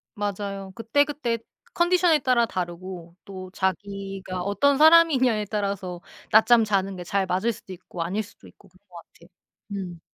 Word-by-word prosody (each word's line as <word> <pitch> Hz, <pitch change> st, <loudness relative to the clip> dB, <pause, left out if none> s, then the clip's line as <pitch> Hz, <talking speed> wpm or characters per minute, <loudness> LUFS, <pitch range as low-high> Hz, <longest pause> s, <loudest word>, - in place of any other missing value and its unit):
맞아요. 200 Hz, -2 st, -4 dB
그때그때 240 Hz, +1 st, 0 dB, 0.3 s
컨디션에 345 Hz, -2 st, +3 dB
따라 255 Hz, -3 st, +2 dB
다르고 175 Hz, -2 st, -6 dB
또 185 Hz, -1 st, -8 dB
자기가 195 Hz, -1 st, -4 dB
어떤 205 Hz, +9 st, +2 dB
사람이냐에 295 Hz, -8 st, +5 dB
따라서 195 Hz, -4 st, -3 dB, 0.3 s
낮잠 225 Hz, +2 st, +6 dB
자는 195 Hz, -2 st, 0 dB
게 180 Hz, -, -7 dB
잘 195 Hz, +2 st, 0 dB
맞을 190 Hz, +6 st, 0 dB
수도 195 Hz, -3 st, -10 dB
있고 175 Hz, -1 st, -6 dB
아닐 190 Hz, +6 st, -2 dB
수도 205 Hz, -, -17 dB
있고 200 Hz, -, -20 dB
그런 185 Hz, +1 st, -26 dB
것 175 Hz, -, -18 dB
같아요. 170 Hz, -, -21 dB, 0.4 s
음. 185 Hz, -4 st, -5 dB
200 Hz, 325 characters per minute, -25 LUFS, 185-235 Hz, 0.4 s, 낮잠